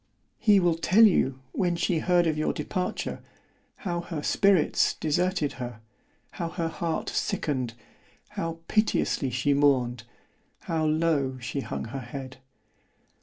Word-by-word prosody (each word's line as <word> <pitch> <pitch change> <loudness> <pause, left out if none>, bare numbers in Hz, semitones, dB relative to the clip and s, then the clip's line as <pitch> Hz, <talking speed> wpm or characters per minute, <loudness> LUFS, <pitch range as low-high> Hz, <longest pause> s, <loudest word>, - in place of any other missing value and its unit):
"He 210 -3 +5
will 175 -3 +2
tell 210 +7 +6
you, 135 -10 +2
when 175 +1 0
she 170 -1 0
heard 175 +1 +3
of 160 -2 +1
your 155 - 0
departure—how 180 0 -5
her 165 -4 -5
spirits 195 -6 +3
deserted 160 0 0
her——how 120 +8 -8
her 170 -1 -2
heart 165 0 -3
sicken'd——how 130 +5 -4
piteously 215 -9 +1
she 130 +4 +1
mourned——how 140 +3 -1
low 155 -4 +1
she 120 +3 -4
hung 135 - -4
her 130 +4 -5
head. 130 +1 -8
155 Hz, 115 wpm, -27 LUFS, 130-175 Hz, -, tell